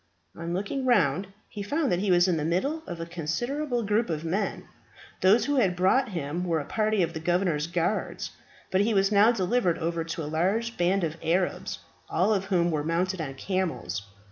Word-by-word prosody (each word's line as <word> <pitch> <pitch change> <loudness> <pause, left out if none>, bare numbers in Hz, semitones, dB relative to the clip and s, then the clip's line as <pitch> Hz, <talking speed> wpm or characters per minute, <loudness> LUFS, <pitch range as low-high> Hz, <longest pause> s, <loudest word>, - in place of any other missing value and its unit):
On 170 0 -5
looking 200 +9 -2
round, 190 - +3 0.2
he 205 - -7
found 285 +7 0
that 175 - +2
he 200 +1 -1
was 175 0 +5
in 175 -3 +2
the 150 - -1
middle 190 - 0
of 175 -2 -6
a 165 - -3
considerable 240 - -2
group 210 +2 +1
of 160 0 -3
men. 195 +5 -1 0.6
Those 210 +5 +5
who 285 +1 +1
had 195 -8 +3
brought 210 +9 +3
him 170 -2 -3
were 170 -3 0
a 145 - -5
party 215 0 +1
of 165 0 -2
the 160 - -4
governor's 175 -2 +1
guards; 175 +4 -2 0.4
but 190 - +3
he 215 +1 +1
was 195 +1 +3
now 210 +3 +6
delivered 195 -4 +1
over 165 0 -1
to 165 0 -4
a - - -4
large 195 +10 0
band 180 +2 +1
of 160 0 -2
Arabs, 175 +3 0 0.3
all 190 +6 +2
of 195 -2 0
whom 175 -3 +2
were 150 -2 -1
mounted 175 +3 0
on 135 -3 -5
camels. 155 - -2
185 Hz, 200 wpm, -27 LUFS, 165-210 Hz, 0.6 s, now